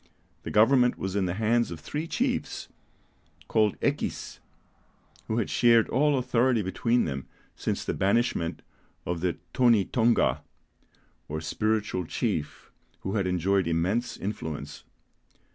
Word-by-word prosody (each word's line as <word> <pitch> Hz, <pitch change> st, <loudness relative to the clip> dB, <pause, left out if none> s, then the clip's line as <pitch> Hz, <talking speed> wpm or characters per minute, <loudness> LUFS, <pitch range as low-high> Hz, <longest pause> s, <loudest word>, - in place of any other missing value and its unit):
The -, -, -6 dB
government 125 Hz, +3 st, +4 dB
was 95 Hz, 0 st, -4 dB
in 95 Hz, -2 st, +1 dB
the 90 Hz, -, -2 dB
hands 115 Hz, +2 st, +2 dB
of 85 Hz, -, -7 dB
three 150 Hz, -, -4 dB
chiefs, -, -, -2 dB, 0.8 s
called 110 Hz, -2 st, +2 dB
Equis, -, -, -2 dB, 0.9 s
who 110 Hz, -, -1 dB
had 115 Hz, -, 0 dB
shared 115 Hz, -2 st, +4 dB
all 145 Hz, +2 st, +3 dB
authority 125 Hz, -2 st, +2 dB
between 115 Hz, +6 st, +1 dB
them 70 Hz, -3 st, -4 dB, 0.3 s
since -, -, -3 dB
the -, -, -1 dB
banishment 95 Hz, -4 st, 0 dB, 0.4 s
of 85 Hz, -1 st, -2 dB
the 90 Hz, -1 st, 0 dB, 0.2 s
Tonï 115 Hz, -6 st, +3 dB
Tonga, 115 Hz, -1 st, +2 dB, 0.9 s
or 80 Hz, +1 st, -3 dB
spiritual 105 Hz, +3 st, -1 dB
chief, 75 Hz, -1 st, -3 dB, 0.3 s
who 95 Hz, -, -3 dB
had 100 Hz, -4 st, 0 dB
enjoyed 95 Hz, +1 st, +1 dB
immense 95 Hz, +9 st, 0 dB
influence. 80 Hz, -7 st, -5 dB
105 Hz, 125 wpm, -27 LUFS, 90-120 Hz, 0.9 s, government